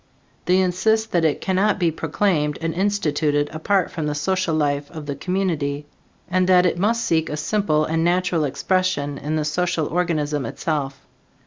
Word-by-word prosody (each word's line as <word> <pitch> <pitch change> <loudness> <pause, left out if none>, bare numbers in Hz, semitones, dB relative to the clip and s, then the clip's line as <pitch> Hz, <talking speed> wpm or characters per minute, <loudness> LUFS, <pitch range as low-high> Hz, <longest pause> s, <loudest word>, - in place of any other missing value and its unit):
They 180 +1 +3
insist 220 +5 +1
that 170 -2 +2
it 155 -3 +1
cannot 195 +2 +1
be 175 -4 +1
proclaimed 155 -1 0
and 165 -1 -2
instituted 155 -7 0
apart 180 +4 0
from 155 -3 -3
the 150 - -2
social 185 +2 0
life 145 -2 0
of 155 -3 -8
the 140 -1 -4
community 150 -4 -2 0.4
and 185 +1 +1
that 180 -1 +6
it 175 -1 +1
must 230 +4 +1
seek 160 -1 +1
a 150 - -3
simple 155 -2 +1
and 165 +1 0
natural 175 -1 +1
expression 145 -2 -1
in 155 +2 -3
the 155 -1 0
social 160 +1 0
organism 150 -4 -1
itself. 140 -1 -3
165 Hz, 170 wpm, -22 LUFS, 150-185 Hz, 0.4 s, that